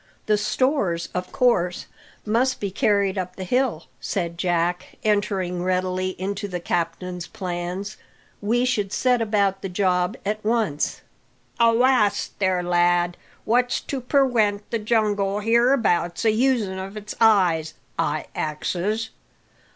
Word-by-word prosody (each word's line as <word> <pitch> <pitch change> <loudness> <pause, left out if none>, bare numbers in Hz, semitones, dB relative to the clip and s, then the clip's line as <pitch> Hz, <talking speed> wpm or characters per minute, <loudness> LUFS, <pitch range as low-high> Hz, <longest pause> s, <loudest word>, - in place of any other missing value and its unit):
"The 215 - +3
stores, 210 - 0
of 180 0 -4
course, 235 -10 +1 0.4
must 240 +4 +1
be 200 -2 -3
carried 200 -3 +1
up 185 0 -5
the 190 - -6
hill," 235 -4 0
said 170 -3 -3
Jack, 175 0 -1
entering 195 -4 0
readily 185 0 -1
into 200 +2 -3
the 180 -2 -4
captain's 175 +1 -3
plans. 180 +2 -5 0.4
"We 235 +4 +1
should 205 -6 0
set 250 +1 +2
about 200 -3 +1
the 195 - -4
job 180 +2 +1
at 215 +1 -2
once." 215 -9 0 0.6
"Avast 230 -2 +3
there, 185 -2 +1
lad! 175 0 +2 0.3
What's 245 +2 +2
to 270 -2 -4
perwent 235 -6 +2
the 230 - 0
jungle 210 -2 +1
hereabouts 230 -5 +2
a 220 - +5
usin' 220 -5 +1
of 195 +2 -7
its 210 0 -7
eyes? 180 -8 +3 0.2
I 150 +1 0
axes. 190 +8 -2
200 Hz, 130 wpm, -23 LUFS, 180-225 Hz, 0.6 s, a